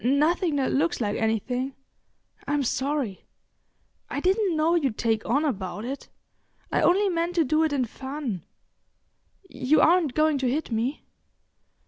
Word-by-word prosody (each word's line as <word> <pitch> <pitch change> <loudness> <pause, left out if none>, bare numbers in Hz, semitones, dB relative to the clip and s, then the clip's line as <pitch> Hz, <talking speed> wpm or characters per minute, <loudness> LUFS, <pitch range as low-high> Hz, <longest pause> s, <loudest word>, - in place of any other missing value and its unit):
"N'nothing 305 - +2
that 270 -2 +1
looks 335 +5 +1
like 210 -3 -1
anything. 245 +4 -1 0.7
I'm 290 0 +1
sorry—I 270 0 -5
didn't 375 +1 +1
know 315 +2 +3
you'd 275 -10 +1
take 225 -2 0
on 285 +6 +2
about 205 -5 -3
it; 275 +3 -6 0.6
I - - +2
only 395 +4 +4
meant 345 -1 -1
to 335 - +4
do 310 +3 +2
it 315 - +1
in 270 -3 +1
fun. 265 - -5 1.0
You 265 0 +2
aren't 330 -5 +4
going 310 -2 +3
to 260 -2 +1
hit 290 +1 -2
me?" 235 +6 -2
280 Hz, 140 wpm, -26 LUFS, 245-315 Hz, 1.0 s, only